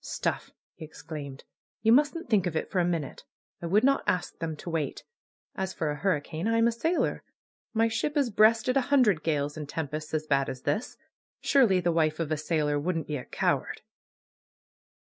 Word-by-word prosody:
^^Stuff!" - - -3 0.2
he 170 - -11
exclaimed. 150 -3 -8 0.4
^^You 225 - +6
mustn't 295 +5 +2
think 205 -6 +2
of 165 - -4
it - - -2
for 185 - +1
a - - +3
minute. 170 -5 -2 0.4
I 170 - -3
would 205 +7 +3
not 275 +1 +3
ask 180 -1 0
them 160 -1 -3
to 160 - -8
wait. 155 -4 -2 0.5
As 190 -1 -4
for 155 -2 -1
a 145 - -4
hurricane! 165 0 -1
I'm 230 0 +3
a - - +2
sailor. 320 +10 0 0.5
My 225 +1 +4
ship 295 +7 -2
has 275 -5 +1
breasted 225 +4 +4
a 270 - +4
hundred 235 - +4
gales 145 -2 -1
and 150 -2 -6
tempests 155 0 -4
as 155 0 -1
bad 140 -2 +1
as 130 - -7
this. 150 +12 -2 0.4
Surely 235 -10 +4
the 175 -1 +1
wife 155 -1 +1
of 160 -2 -2
a 155 - +1
sailor 150 -1 0
wouldn't 165 +1 -2
be 150 - -3
a 125 - -8
coward - - -1
170 Hz, 190 wpm, -28 LUFS, 150-225 Hz, 0.5 s, ^^You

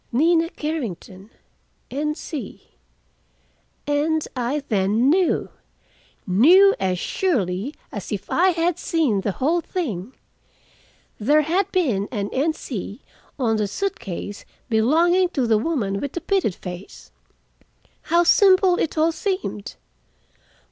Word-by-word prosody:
"Nina 330 +6 +3
Carrington, 220 - -5 0.6
N. 300 +3 -2
C." 305 -3 -8 1.1
And 300 +2 0
I 260 +4 -2
then 210 +6 +2
knew, 365 +1 +1 0.8
knew 345 - +6
as 185 -1 0
surely 220 - -1 0.2
as - - -7
if - - -4
I 370 +2 +4
had 345 0 0
seen 285 -12 +1
the 200 - -2
whole 320 - +1
thing. 250 - -4 1.0
There 295 +8 +3
had 370 +6 0
been 245 - 0
an 205 -4 -3
N. 300 +5 +1
C. 225 - -7 0.3
on 230 -5 +1
the 210 -1 0
suit 390 - -3
case 205 -1 -6 0.3
belonging 335 +11 +3
to 260 - +2
the 220 -2 +3
woman 220 -9 -1
with 285 - -4
the 345 - -4
pitted 360 - 0
face. 180 +1 -10 0.9
How 340 +1 +2
simple 370 0 +5
it 315 - -2
all 320 +2 +3
seemed. 370 - -4
290 Hz, 120 wpm, -22 LUFS, 210-340 Hz, 1.1 s, knew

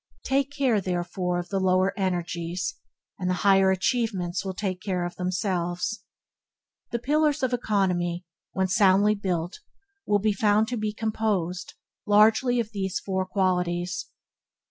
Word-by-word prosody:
Take 270 0 +1
care, 270 -7 +1
therefore, 180 0 -2
of 175 0 -4
the 195 - 0
lower 185 0 +2
energies, 175 -3 -2 0.5
and 180 -1 -1
the 185 - +1
higher 195 -1 +6
achievements 190 -3 0
will 190 -1 -4
take 185 -2 -3
care 185 -3 -1
of 175 0 -6
themselves. 180 +1 -2 0.9
The 235 - -1
Pillar 300 +5 +2
of 255 -1 +1
Economy, 180 -6 0 0.3
when 190 0 0
soundly 200 +1 +4
built, 180 -4 -3 0.5
will 205 - +4
be 210 +1 +1
found 210 +2 +3
to 245 - -2
be 215 -1 -1
composed 210 -5 -2 0.3
largely 220 +4 +4
of 225 -2 -2
these 190 -3 -2
four 190 -1 -2
qualities: 180 -2 -1
1. - - -41
190 Hz, 145 wpm, -26 LUFS, 180-215 Hz, 0.9 s, higher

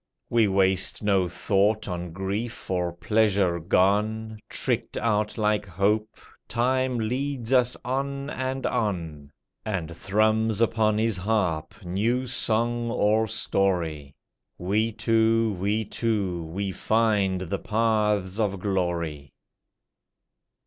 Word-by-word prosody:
We 115 -2 +4
waste 95 +1 +2
no 95 -3 +2
thought 105 +4 +1
on 90 -2 -4
grief 100 +5 -4
or 90 -1 0
pleasure 100 -1 +1
gone; 105 +5 +1
Tricked - - -1
out 105 -1 0
like 105 -1 +1
hope, 100 +4 0 0.3
time 130 +1 +1
leads 125 +2 -2
us 125 -1 +3
on 140 +2 -2
and 130 0 -3
on, 85 - -2 0.3
And 90 -6 -3
thrums 110 +3 +1
upon 110 -2 +2
his 110 -2 +1
harp 90 -7 -1
new 115 +8 0
song 120 -1 0
or 110 0 +2
story. 85 -9 -1 0.4
We 105 +5 0
two, 115 0 +2
we 105 +3 0
two, 100 -6 -1
we 95 +4 -3
find 105 -3 +1
the 90 - -3
paths 105 -3 0
of 100 -3 0
glory. 85 -7 -2
105 Hz, 110 wpm, -26 LUFS, 95-115 Hz, 0.4 s, We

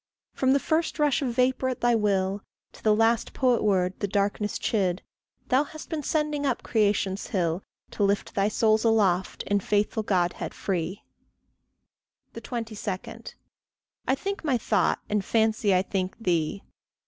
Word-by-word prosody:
From 260 0 +2
the 280 - +3
first 320 +3 0
rush 295 -3 +2
of 260 -3 -1
vapour 260 +1 +2
at 255 - -4
thy 240 0 +3
will, 200 -2 +1 0.3
To - - -16
the 215 -1 +4
last 225 +1 +2
poet 250 -3 +2
word 185 -3 +2
that 205 -2 -2
darkness 205 +1 0
chid, 185 -4 0 0.5
Thou 260 +3 +4
hast 310 +1 -10
been 320 -2 -2
sending 300 0 -1
up 265 -4 -1
creation's 205 -3 0
hill, 175 -2 -1 0.3
To 205 - -1
lift 200 0 0
thy 195 0 +2
souls 215 0 +2
aloft 200 -5 +2
in 205 0 +1
faithful 210 +3 0
Godhead 180 -4 -1
free. 185 0 -3 1.3
22. 225 -5 -5 0.8
I 265 - +3
think 395 +6 -4
my 275 -5 +2
thought, - - +1
and 210 -1 0
fancy 220 -1 +2
I 185 - +3
think 190 -1 -3
thee. 180 -3 -1
215 Hz, 150 wpm, -26 LUFS, 195-250 Hz, 1.3 s, the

